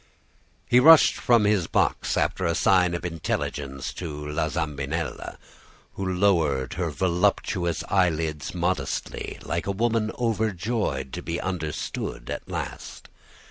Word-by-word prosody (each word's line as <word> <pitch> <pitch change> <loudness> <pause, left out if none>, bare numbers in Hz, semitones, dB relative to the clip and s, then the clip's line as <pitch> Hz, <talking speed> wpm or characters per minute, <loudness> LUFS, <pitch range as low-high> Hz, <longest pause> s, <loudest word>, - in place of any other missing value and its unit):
"He 120 - +5
rushed 160 +4 +8
from 120 -3 +3
his 100 -6 +2
box, - - +1
after - - 0
a 85 - +1
sign 90 -1 +3
of 85 - -5
intelligence 70 -4 -3
to 75 -4 -6
La 80 +1 -1
Zambinella, 80 0 -3 0.6
who 95 -1 -3
lowered 85 -9 +2
her - - -2
voluptuous 85 -1 0
eyelids 80 -4 0
modestly, 85 -5 -2
like 85 +2 -3
a - - +1
woman 110 +1 0
overjoyed 110 - -1
to - - -4
be 85 +1 -3
understood 85 -5 -4
at - - -6
last. - - -6
85 Hz, 125 wpm, -25 LUFS, 75-100 Hz, 0.6 s, rushed